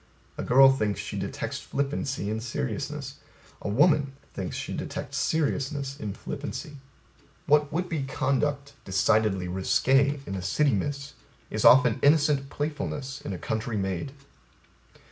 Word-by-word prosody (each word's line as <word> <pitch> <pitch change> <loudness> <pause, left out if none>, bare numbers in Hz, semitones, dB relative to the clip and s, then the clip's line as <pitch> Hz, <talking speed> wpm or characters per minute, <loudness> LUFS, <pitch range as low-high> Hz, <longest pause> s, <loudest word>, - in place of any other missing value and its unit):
A - - -4
girl 135 +2 +7
thinks 105 -7 -1
she - - -5
detects - - -4
flippancy 135 -6 -2
in 110 - -2
seriousness. 110 - -4 0.4
A - - -3
woman 145 - +3 0.2
thinks - - -4
she - - -4
detects 140 +1 -4
seriousness 140 -2 -1
in 105 -2 -4
flippancy. 150 +2 -6 0.7
What 150 0 +3
would 180 +3 -1
be 160 -4 -2
conduct 140 +2 -1
decidedly 95 -1 +2
risqué 130 +9 +2
in 95 - -5
a 95 - -3
city 140 - +2
miss, 140 +7 -3 0.4
is - - -2
often 125 -3 +7
innocent 145 -2 +3
playfulness 145 -2 -4
in - - -5
a 95 - -3
country 110 +3 -3
maid. 95 +4 -2
135 Hz, 135 wpm, -27 LUFS, 110-145 Hz, 0.7 s, girl